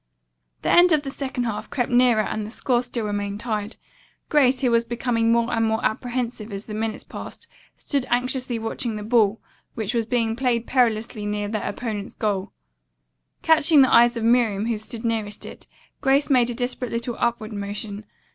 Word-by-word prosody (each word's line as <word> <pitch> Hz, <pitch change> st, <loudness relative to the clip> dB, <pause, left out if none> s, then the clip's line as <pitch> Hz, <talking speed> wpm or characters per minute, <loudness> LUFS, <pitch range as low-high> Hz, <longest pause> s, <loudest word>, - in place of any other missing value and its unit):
The -, -, +1 dB
end 355 Hz, +1 st, +6 dB
of 300 Hz, -2 st, +2 dB
the 275 Hz, -, -4 dB
second 265 Hz, -3 st, -3 dB
half 215 Hz, -2 st, -4 dB
crept 245 Hz, -3 st, -1 dB
nearer 245 Hz, -3 st, +4 dB
and 215 Hz, -, -3 dB
the 210 Hz, -, -6 dB
score 245 Hz, +1 st, 0 dB
still 240 Hz, -2 st, -4 dB
remained 205 Hz, 0 st, -3 dB
tied. 215 Hz, -2 st, -3 dB, 0.5 s
Grace, 265 Hz, -4 st, +3 dB
who 250 Hz, -3 st, +2 dB
was 230 Hz, 0 st, +3 dB
becoming 235 Hz, -1 st, 0 dB
more 235 Hz, +1 st, +2 dB
and 225 Hz, -1 st, +1 dB
more 220 Hz, 0 st, 0 dB
apprehensive 235 Hz, -1 st, -2 dB
as 200 Hz, +1 st, -4 dB
the 215 Hz, -, -7 dB
minutes 220 Hz, 0 st, -3 dB
passed, -, -, -9 dB, 0.3 s
stood 275 Hz, -3 st, -2 dB
anxiously 250 Hz, 0 st, 0 dB
watching 225 Hz, 0 st, -3 dB
the 210 Hz, -, -5 dB
ball, 220 Hz, -1 st, +3 dB, 0.4 s
which 220 Hz, 0 st, -3 dB
was 230 Hz, -2 st, 0 dB
being 230 Hz, -2 st, 0 dB
played 240 Hz, -2 st, 0 dB
perilously 230 Hz, -3 st, +1 dB
near 205 Hz, 0 st, -2 dB
their 215 Hz, 0 st, -2 dB
opponents' 210 Hz, -2 st, -5 dB
goal. 200 Hz, -2 st, -2 dB, 0.9 s
Catching 315 Hz, -2 st, +5 dB
the 260 Hz, -, +2 dB
eyes 240 Hz, 0 st, +6 dB
of 230 Hz, -, -3 dB
Miriam, 225 Hz, -3 st, +3 dB
who 230 Hz, -2 st, -1 dB
stood 225 Hz, +2 st, -6 dB
nearest 220 Hz, -3 st, -2 dB
it, -, -, -11 dB, 0.3 s
Grace 275 Hz, +2 st, +2 dB
made 245 Hz, -2 st, +4 dB
a 240 Hz, -, -3 dB
desperate 250 Hz, 0 st, -3 dB
little 235 Hz, +1 st, -3 dB
upward 230 Hz, -2 st, -1 dB
motion. 205 Hz, +1 st, -5 dB
230 Hz, 185 wpm, -23 LUFS, 215-245 Hz, 0.9 s, end